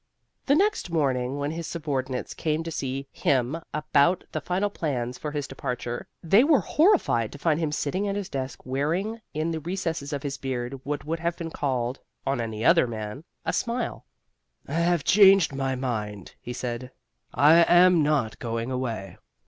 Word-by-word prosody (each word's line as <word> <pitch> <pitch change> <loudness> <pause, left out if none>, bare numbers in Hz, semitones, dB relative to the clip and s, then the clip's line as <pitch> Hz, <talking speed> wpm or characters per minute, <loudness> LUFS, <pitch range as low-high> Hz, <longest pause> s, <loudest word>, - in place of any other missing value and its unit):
The 280 - +5
next 405 - +1
morning, 135 -5 0
when 145 +1 -2
his 165 0 -5
subordinates 135 -6 -3
came 155 0 -1
to 165 - -5
see 135 -2 -3
him 135 +4 0
about 155 +3 +2
the 155 - -3
final 190 +5 -1
plans 125 -8 -3
for 150 - -3
his 145 -1 -3
departure, 125 -2 -4 0.2
they 195 +8 +5
were 290 -2 +5
horrified 300 - +3
to - - -8
find 155 +1 +1
him 160 -3 -1
sitting 185 +7 -1
at 200 - -1
his 205 -2 -3
desk 135 -1 -5
wearing 170 - -1
in 155 +2 0
the 160 - -2
recesses 165 -3 -3
of 140 -2 -3
his 140 -2 -4
beard 130 0 -4
what 145 +1 -3
would 165 +2 -2
have 170 +1 -1
been 165 -1 -5
called 130 -4 -1 0.3
(on 135 -3 0
any 110 -1 -4
other 165 -6 +5
man) 110 +4 -6 0.2
a - - 0
smile. 235 0 -2 0.6
"I 140 - -6
have 170 -1 +2
changed 195 -5 +6
my 135 -1 -1
mind," 105 -6 -4
he 120 - -6
said. 125 0 -4 0.5
"I 150 +3 +7
am 175 -1 +7
not 145 -7 +1
going 115 +1 -3
away." 120 -6 -4
145 Hz, 175 wpm, -26 LUFS, 130-170 Hz, 0.6 s, I